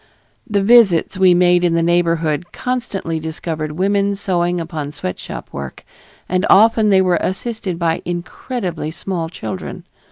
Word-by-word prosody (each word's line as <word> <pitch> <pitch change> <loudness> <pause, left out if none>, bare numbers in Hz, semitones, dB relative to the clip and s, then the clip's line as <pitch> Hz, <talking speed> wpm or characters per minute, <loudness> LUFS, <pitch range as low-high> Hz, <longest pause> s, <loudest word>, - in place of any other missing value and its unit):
The 200 -2 +1
visits 200 -5 +4
we 185 -2 +6
made 175 0 +4
in 170 -1 +2
the 165 - +2
neighborhood 170 -1 +1
constantly 235 -10 -3
discovered 155 -1 -4
women 200 +3 +1
sewing 180 -3 -1
upon 155 -3 -5
sweatshop 90 - -6
work, 70 -1 -7 0.4
and 185 +1 0
often 220 +1 +5
they 190 -1 +5
were 180 -3 +2
assisted 195 -2 -3
by 165 -1 0
incredibly 175 - -4
small 170 0 -4
children. 110 - -6
175 Hz, 135 wpm, -18 LUFS, 165-195 Hz, 0.4 s, we